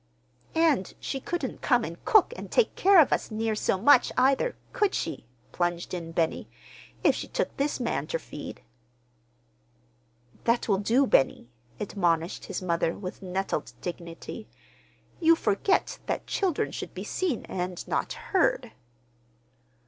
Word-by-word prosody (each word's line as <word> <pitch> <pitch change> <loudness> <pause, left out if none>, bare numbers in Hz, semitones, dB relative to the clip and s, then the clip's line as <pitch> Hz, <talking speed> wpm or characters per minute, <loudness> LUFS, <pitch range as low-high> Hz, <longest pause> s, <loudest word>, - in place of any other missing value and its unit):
"And 315 - +2
she 270 - -3
couldn't 290 -1 -4
come 245 -2 +3
and 170 -3 -7
cook 430 +1 +5
and - - -8
take 485 - +2
care 390 -1 +6
of 300 - +5
us - - -1
near 220 0 -1
so 210 - 0
much, 245 +5 +5
either, 275 - +3 0.2
could 415 -5 +1
she," - - -4 0.2
plunged 175 0 -2
in 170 -2 -4
Benny, 165 -1 -1 0.5
"if - - +5
she - - -5
took - - -2
this 285 0 0
man 190 - -1
ter 165 - -1
feed?" 150 - -9 1.8
"That 235 +1 +2
will 195 -3 +2
do, 235 +7 +3
Benny," 135 - +2 0.3
admonished 175 -4 0
his 190 -1 -5
mother, 170 -2 0
with 185 -1 -7
nettled 190 +1 -3
dignity. 175 +5 -7 0.7
"You 330 0 +6
forget 325 - +1
that - - -2
children 370 -6 0
should - - -6
be - - -5
seen 345 - -2
and 180 -1 -4
not - - -1
heard." 470 - 0
225 Hz, 140 wpm, -27 LUFS, -, 1.8 s, care